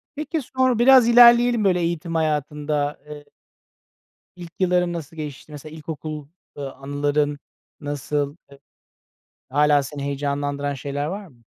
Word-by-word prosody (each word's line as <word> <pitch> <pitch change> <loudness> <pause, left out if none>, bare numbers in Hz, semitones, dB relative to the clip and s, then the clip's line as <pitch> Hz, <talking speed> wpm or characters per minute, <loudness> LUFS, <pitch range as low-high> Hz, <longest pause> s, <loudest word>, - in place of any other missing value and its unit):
Peki, 305 +2 -3
sonra 255 -2 0
biraz 255 -1 +7
ilerleyelim 240 -1 +6
böyle 185 -3 +2
eğitim 170 -1 -2
hayatında 150 -1 -1
eee 150 -1 -9 1.1
İlk 175 -2 -10
yılların 180 -1 +1
nasıl 165 -2 -7
geçti? 150 -1 -8
Mesela 150 +1 -10
ilkokul, 155 -1 -7 0.3
ııı, 140 -1 -5
a - - -21
anıların 145 +1 -1 0.4
nasıl? 145 0 -3 0.2
Eee. 140 - -15 0.9
Hâlâ 145 +1 +3
seni 140 +1 -7
heyecanlandıran 140 0 -2
şeyler 140 +1 -4
var 195 +5 -5
mı? 120 -7 -23
150 Hz, 130 wpm, -22 LUFS, 145-180 Hz, 1.1 s, biraz